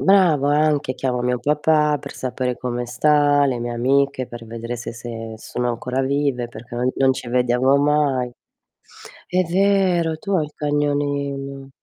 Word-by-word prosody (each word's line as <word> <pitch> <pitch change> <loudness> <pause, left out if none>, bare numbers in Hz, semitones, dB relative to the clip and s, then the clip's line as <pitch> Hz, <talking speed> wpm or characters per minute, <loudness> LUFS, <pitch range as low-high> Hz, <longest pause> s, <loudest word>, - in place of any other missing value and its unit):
Brava 155 -7 +4
anche, 150 -4 +1
chiamo 125 -2 -1
mio 125 0 0
papà 150 +1 +2
per - - -8
sapere 125 -1 -3
come 120 -1 -3
sta, 145 +3 +3
le 130 -3 -1
mie 120 0 -3
amiche, 135 +1 +1
per 120 -1 -9
vedere 115 +1 -6
se 120 - -6
se 115 -1 -7
sono 125 +2 -3
ancora 125 +2 -2
vive, 135 -3 0
perché 120 +1 -11
no 125 +2 0
non 135 -1 +4
ci 130 - -7
vediamo 125 +2 +3
mai. 145 -3 +2 1.0
È 185 +1 +2
vero, 180 -3 +2
tu 200 +5 -5
hai 165 -5 +2
il 150 - -11
cagnolino. 145 -2 -2
135 Hz, 155 wpm, -21 LUFS, 125-150 Hz, 1.0 s, Brava